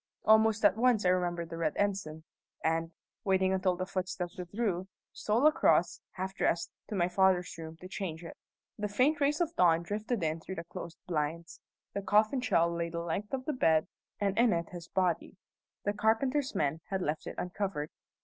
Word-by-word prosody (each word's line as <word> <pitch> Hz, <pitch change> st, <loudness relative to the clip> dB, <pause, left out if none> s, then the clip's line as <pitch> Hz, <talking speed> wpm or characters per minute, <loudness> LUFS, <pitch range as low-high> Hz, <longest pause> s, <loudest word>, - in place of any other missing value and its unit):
Almost 220 Hz, 0 st, +5 dB
at 200 Hz, -2 st, +6 dB
once 235 Hz, -4 st, +3 dB
I -, -, +5 dB
remembered 175 Hz, -2 st, 0 dB
the 165 Hz, -, -5 dB
red 155 Hz, -2 st, +1 dB
ensign, 195 Hz, -6 st, -1 dB, 0.4 s
and, 165 Hz, +1 st, +1 dB, 0.3 s
waiting 190 Hz, -2 st, +2 dB
until 185 Hz, -1 st, +1 dB
the 185 Hz, +1 st, -3 dB
footsteps 185 Hz, -2 st, -3 dB
withdrew, 185 Hz, 0 st, -2 dB, 0.3 s
stole 225 Hz, +6 st, +1 dB
across, 305 Hz, -, +4 dB
half 190 Hz, +1 st, -4 dB
dressed, 170 Hz, -3 st, 0 dB, 0.2 s
to 210 Hz, -, -4 dB
my 175 Hz, -2 st, +2 dB
father's 180 Hz, 0 st, +2 dB
room 160 Hz, 0 st, -8 dB
to 180 Hz, -, -10 dB
change 180 Hz, -4 st, -5 dB
it. 165 Hz, -, -8 dB, 0.4 s
The 210 Hz, -, -1 dB
faint 260 Hz, +9 st, +2 dB
rays 290 Hz, +2 st, +2 dB
of 335 Hz, -1 st, -1 dB
dawn 170 Hz, -2 st, +4 dB
drifted 210 Hz, +3 st, -2 dB
in 160 Hz, +1 st, 0 dB
through 190 Hz, +3 st, -7 dB
the 165 Hz, -, -5 dB
closed 170 Hz, 0 st, -8 dB
blinds. 165 Hz, 0 st, -3 dB, 0.3 s
The 200 Hz, -, -2 dB
coffin 215 Hz, +6 st, +3 dB
shell 170 Hz, -7 st, +2 dB
lay 170 Hz, 0 st, -2 dB
the 170 Hz, 0 st, -4 dB
length 170 Hz, +5 st, -3 dB
of 260 Hz, -1 st, -3 dB
the 305 Hz, -, -1 dB
bed, 160 Hz, -, +3 dB, 0.3 s
and 200 Hz, -1 st, 0 dB
in 235 Hz, -1 st, +5 dB
it 170 Hz, -1 st, -2 dB
his 175 Hz, -1 st, -9 dB
body. 180 Hz, 0 st, -1 dB, 0.5 s
The 205 Hz, -, 0 dB
carpenter's 255 Hz, +6 st, +1 dB
men 155 Hz, -2 st, 0 dB
had 190 Hz, -2 st, -1 dB
left 150 Hz, 0 st, -2 dB
it -, -, -6 dB
uncovered. 180 Hz, -4 st, -3 dB
185 Hz, 190 wpm, -31 LUFS, 170-210 Hz, 0.5 s, at